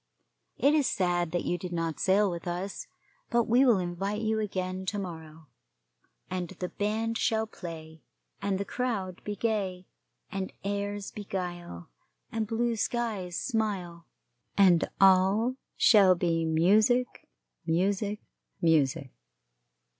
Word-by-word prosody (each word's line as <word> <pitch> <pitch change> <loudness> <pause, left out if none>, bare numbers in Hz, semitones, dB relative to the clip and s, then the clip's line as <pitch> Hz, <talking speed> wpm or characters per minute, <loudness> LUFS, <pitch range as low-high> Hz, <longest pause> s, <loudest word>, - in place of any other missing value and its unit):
It 285 +2 +4
is 300 -3 +3
sad 175 -2 +1
that 175 - -1
you 175 - -1
did 180 +1 -6
not 165 -2 -2
sail 195 +1 +3
with 170 0 -6
us, 180 +3 -4 0.4
but 235 0 +3
we 240 +4 +4
will 240 -6 +5
invite 190 +4 -2
you 220 0 0
again 185 -3 -3
to 205 - -1
morrow, 160 -4 -7 0.8
and 180 -2 -3
the 180 -1 -5
band 225 +2 -1
shall 220 -2 +1
play, 160 -6 -9 0.4
and 200 -1 0
the 200 - -2
crowd 200 -8 -3
be 210 - -4
gay, 195 -5 -2 0.5
and 190 -1 -3
airs 200 0 -3
beguile, 175 - -6 0.4
and 220 -1 -2
blue 230 +1 0
skies 210 -7 -2
smile, 195 -8 -2 0.5
and 180 -4 +5
all 195 +6 +4 0.2
shall 195 -5 +6
be 165 -2 0
music, 210 +10 +2 0.4
music, 200 +5 0 0.4
music. 155 -5 +2
195 Hz, 125 wpm, -29 LUFS, 175-215 Hz, 0.8 s, shall